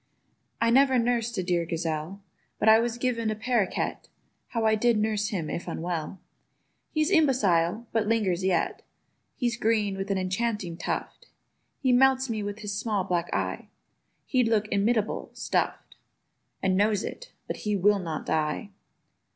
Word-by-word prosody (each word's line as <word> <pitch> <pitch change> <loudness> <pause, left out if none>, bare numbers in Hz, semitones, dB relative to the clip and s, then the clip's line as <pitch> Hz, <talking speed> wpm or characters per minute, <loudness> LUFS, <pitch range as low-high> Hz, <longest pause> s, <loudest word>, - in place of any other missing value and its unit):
I 230 0 +3
never 265 +1 +5
nursed 235 -1 0
a 185 - 0
dear 175 -1 +1
gazelle; 165 +3 -3 0.3
But - - 0
I 220 0 +8
was 235 0 -1
given 240 -3 0
a 215 - -1
parroquet— 225 -3 0 0.5
(How 230 -2 -1
I 220 - +4
did 230 +1 +3
nurse 210 -1 0
him 185 -8 -3
if 170 - -4
unwell!) 170 +1 -4 0.7
He's 310 +3 0
imbecile, 225 - +3
but 220 -2 0
lingers 200 -5 +1
yet. 185 -3 0 0.5
He's 240 -2 0
green, 215 -3 +1
with 195 +1 -4
an 195 - +1
enchanting 190 -1 -2
tuft; - - -4 0.5
He 260 -3 +1
melts 265 0 +4
me 215 -1 -2
with 205 +1 -5
his 205 -1 -4
small 210 -2 -1
black 175 -2 -1
eye: - - -2 0.6
He'd 255 -3 +2
look 215 -2 +2
inimitable 215 +2 0
stuff'd, - - -2 0.7
And 190 -1 +2
knows 205 +1 +2
it—but - - -7
he 210 -1 -1
will 200 +1 +3
not 165 -4 -4
die! 155 +6 -1
210 Hz, 150 wpm, -27 LUFS, 185-235 Hz, 0.7 s, I